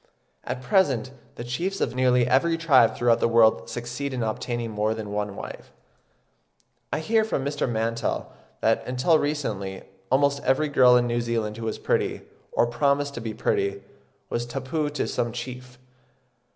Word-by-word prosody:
At 130 Hz, 0 st, -5 dB
present 130 Hz, -, +2 dB, 0.2 s
the -, -, -6 dB
chiefs 175 Hz, +11 st, -3 dB
of -, -, -1 dB
nearly 125 Hz, -1 st, +3 dB
every 165 Hz, +6 st, +3 dB
tribe 140 Hz, -8 st, +4 dB
throughout 120 Hz, -1 st, +3 dB
the -, -, +3 dB
world 115 Hz, -1 st, +4 dB
succeed 120 Hz, +3 st, -4 dB
in 120 Hz, -, -1 dB
obtaining 115 Hz, +1 st, -3 dB
more 105 Hz, +1 st, 0 dB
than 110 Hz, -2 st, -6 dB
one 105 Hz, -1 st, -3 dB
wife. -, -, -9 dB, 1.2 s
I 155 Hz, -, -1 dB
hear 220 Hz, +6 st, +2 dB
from 145 Hz, -11 st, -2 dB
Mr. 145 Hz, -2 st, -1 dB
Mantell 115 Hz, 0 st, -2 dB, 0.3 s
that, 115 Hz, 0 st, +2 dB
until 130 Hz, +6 st, +3 dB
recently, 105 Hz, -11 st, -3 dB, 0.3 s
almost 140 Hz, +2 st, +2 dB
every 140 Hz, +3 st, +2 dB
girl 125 Hz, -3 st, +6 dB
in 120 Hz, -, +2 dB
New 120 Hz, 0 st, 0 dB
Zealand 115 Hz, -2 st, -2 dB
who 115 Hz, -, -5 dB
was 110 Hz, -, -2 dB
pretty, -, -, -1 dB, 0.3 s
or -, -, +3 dB
promised 140 Hz, +3 st, +1 dB
to 120 Hz, -, -6 dB
be 110 Hz, -1 st, -5 dB
pretty, 100 Hz, 0 st, -1 dB, 0.4 s
was 120 Hz, 0 st, -3 dB
tapu 135 Hz, +4 st, -2 dB
to 145 Hz, -1 st, -2 dB
some 120 Hz, -1 st, -1 dB
chief. 125 Hz, +1 st, -7 dB
125 Hz, 165 wpm, -25 LUFS, 115-140 Hz, 1.2 s, girl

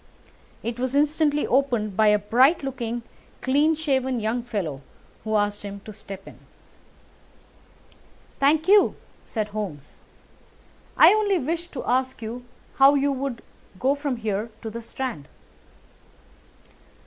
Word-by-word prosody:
It 235 Hz, +1 st, -4 dB
was 255 Hz, +1 st, -1 dB
instantly 295 Hz, 0 st, +2 dB
opened 240 Hz, -6 st, +1 dB
by 220 Hz, +1 st, +4 dB
a 210 Hz, 0 st, +5 dB
bright 255 Hz, -, +3 dB
looking, 240 Hz, -3 st, -4 dB, 0.4 s
clean 290 Hz, +5 st, +2 dB
shaven 265 Hz, -5 st, 0 dB
young 220 Hz, +3 st, -1 dB
fellow, 195 Hz, -, -4 dB, 0.4 s
who 220 Hz, 0 st, -1 dB
asked 205 Hz, 0 st, 0 dB
him 200 Hz, -1 st, -7 dB
to 215 Hz, -, -10 dB
step 195 Hz, -2 st, -10 dB
in. -, -, -13 dB, 2.0 s
"Thank 300 Hz, +4 st, +3 dB
you," 405 Hz, +1 st, +5 dB, 0.3 s
said 215 Hz, -2 st, -3 dB
Holmes, 195 Hz, -10 st, -6 dB, 1.0 s
"I -, -, +8 dB
only 415 Hz, -3 st, +2 dB
wished 335 Hz, +4 st, -3 dB
to 265 Hz, -, -5 dB
ask 260 Hz, +1 st, 0 dB
you 235 Hz, +2 st, -6 dB, 0.3 s
how 275 Hz, +1 st, +7 dB
you 280 Hz, 0 st, +2 dB
would 270 Hz, -3 st, -4 dB, 0.4 s
go 265 Hz, +2 st, +3 dB
from 285 Hz, -2 st, -2 dB
here 215 Hz, 0 st, -2 dB
to 220 Hz, -, -5 dB
the 235 Hz, +2 st, -6 dB
Strand." 230 Hz, -, -5 dB
250 Hz, 130 wpm, -24 LUFS, 215-280 Hz, 2.0 s, I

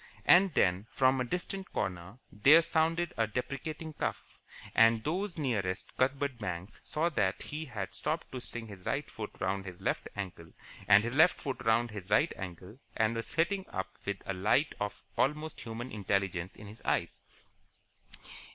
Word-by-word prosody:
And 185 Hz, +2 st, +7 dB
then, 95 Hz, +3 st, +2 dB
from 130 Hz, 0 st, +3 dB
a -, -, +2 dB
distant 180 Hz, +7 st, -4 dB
corner, 90 Hz, +3 st, -3 dB
there 145 Hz, +11 st, +7 dB
sounded 165 Hz, +1 st, +1 dB
a 115 Hz, -, +2 dB
deprecating, 150 Hz, +7 st, -4 dB
cough, -, -, -4 dB, 0.3 s
and 115 Hz, -1 st, +5 dB
those 180 Hz, +5 st, -2 dB
nearest 105 Hz, -10 st, -2 dB
Cuthbert 135 Hz, -1 st, 0 dB
Banks 95 Hz, -2 st, -5 dB
saw 160 Hz, +3 st, 0 dB
that 105 Hz, -, 0 dB
he 155 Hz, +2 st, -5 dB
had 105 Hz, -8 st, -5 dB
stopped -, -, -2 dB
twisting 120 Hz, -2 st, -6 dB
his 100 Hz, -4 st, -11 dB
right 140 Hz, +8 st, -1 dB
foot 105 Hz, -2 st, -5 dB
round 95 Hz, +1 st, -1 dB
his 90 Hz, -1 st, -8 dB
left -, -, -1 dB
ankle 90 Hz, -4 st, -6 dB, 0.3 s
and 105 Hz, 0 st, +7 dB
his 120 Hz, +1 st, -2 dB
left 160 Hz, +4 st, +6 dB
foot 135 Hz, -5 st, -4 dB
round 115 Hz, +1 st, +3 dB
his 100 Hz, -2 st, -8 dB
right 145 Hz, +11 st, +4 dB
ankle 95 Hz, +5 st, -8 dB, 0.2 s
and 110 Hz, 0 st, +2 dB
was 115 Hz, -, -3 dB
sitting 190 Hz, +4 st, +1 dB
up 95 Hz, -, -3 dB
with 100 Hz, -1 st, -2 dB
a 100 Hz, -, -2 dB
light 105 Hz, +11 st, +2 dB
of 105 Hz, 0 st, -4 dB, 0.2 s
almost 150 Hz, +3 st, 0 dB
human 120 Hz, +2 st, -6 dB
intelligence 95 Hz, -3 st, -1 dB
in 105 Hz, -, -11 dB
his 105 Hz, +2 st, -11 dB
eyes. -, -, 0 dB
115 Hz, 165 wpm, -32 LUFS, 100-150 Hz, 0.3 s, And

